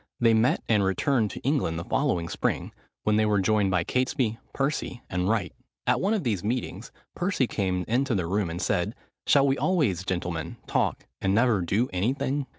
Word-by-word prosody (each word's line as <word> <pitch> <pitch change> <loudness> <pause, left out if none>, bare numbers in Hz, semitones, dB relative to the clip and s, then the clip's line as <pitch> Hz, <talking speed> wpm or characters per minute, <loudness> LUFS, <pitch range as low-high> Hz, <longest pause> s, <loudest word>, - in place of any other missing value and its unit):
They 115 -1 +5
met 110 +3 +2
and 105 -3 +3
returned 105 +4 +1
to - - -7
England 130 - 0
the 85 - -3
following 90 - 0
spring, - - -2 0.3
when 105 0 +2
they 110 - +3
were 105 -1 +3
joined 100 0 +2
by 90 -2 +1
Catesby, 125 - 0
Percy, 135 -3 -2
and 90 0 0
Wright. 110 -6 0 0.3
At - - +2
one 205 +4 +2
of 205 - -2
these 105 -8 -1
meetings 120 +4 -3 0.2
Percy 180 -7 0
came 95 -5 -1
into 125 +2 +1
the 90 -4 0
room 95 +1 0
and 85 +1 -4
said, 100 +3 0 0.3
"Shall 140 -1 +5
we 135 0 +1
always, 140 - +1
gentlemen, 85 -3 -3
talk, - - 0 0.2
and 95 0 +2
never 115 -3 +3
do 100 +8 +1
any 100 +8 +1
thing?" 140 0 -2
110 Hz, 190 wpm, -26 LUFS, 95-130 Hz, 0.3 s, They